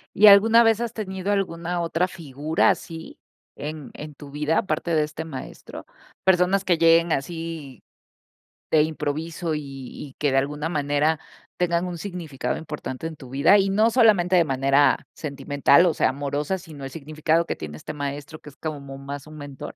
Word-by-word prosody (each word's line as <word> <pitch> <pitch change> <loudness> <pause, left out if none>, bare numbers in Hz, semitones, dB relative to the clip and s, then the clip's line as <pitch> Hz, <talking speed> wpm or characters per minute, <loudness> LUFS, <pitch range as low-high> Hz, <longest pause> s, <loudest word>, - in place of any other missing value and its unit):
¿Y 210 - +7
alguna 220 +3 +8
vez 225 -1 +3
has 235 -1 -2
tenido 190 -2 -3
alguna 175 -3 -2
otra 170 +2 0
figura 155 -2 0
así 165 -1 -5 0.4
en 150 -1 -6
en 150 0 -8
tu 140 0 -12
vida, 150 +3 0
aparte 180 -5 -1
de 155 -1 +3
este 150 +1 -6
maestro? 145 -5 -9 0.4
Personas 190 +1 +3
que 175 -3 +2
lleguen 165 0 +5
así 160 - -4 0.9
de 155 -1 +5
improviso 160 +2 -3
y 150 - -3
y 135 0 -9
que 145 -2 +1
de 135 - +2
alguna 150 +3 -1
manera, 150 0 +1 0.4
tengan 175 0 +1
un 175 -1 -5
significado 170 -7 -4
importante 150 -2 -6
en 165 - -8
tu 130 -4 -12
vida 140 +10 +5
y 195 0 +2
no 215 +4 +3
solamente, 210 -7 +4
de 175 - +6
manera 135 0 +2
sentimental, 145 +2 +2
o 170 - +3
sea, - - +2
amorosa, 145 +5 -2
sino 160 -6 -11
el 135 - -5
significado 155 +3 0
que - - -3
tiene 75 -1 -8
este - - -7
maestro, 145 +1 -5
que - - -12
es 140 - -18
como 140 -3 -6
más 140 +1 -7
un 155 0 -11
mentor. 145 -2 -8
155 Hz, 175 wpm, -24 LUFS, 145-175 Hz, 0.9 s, alguna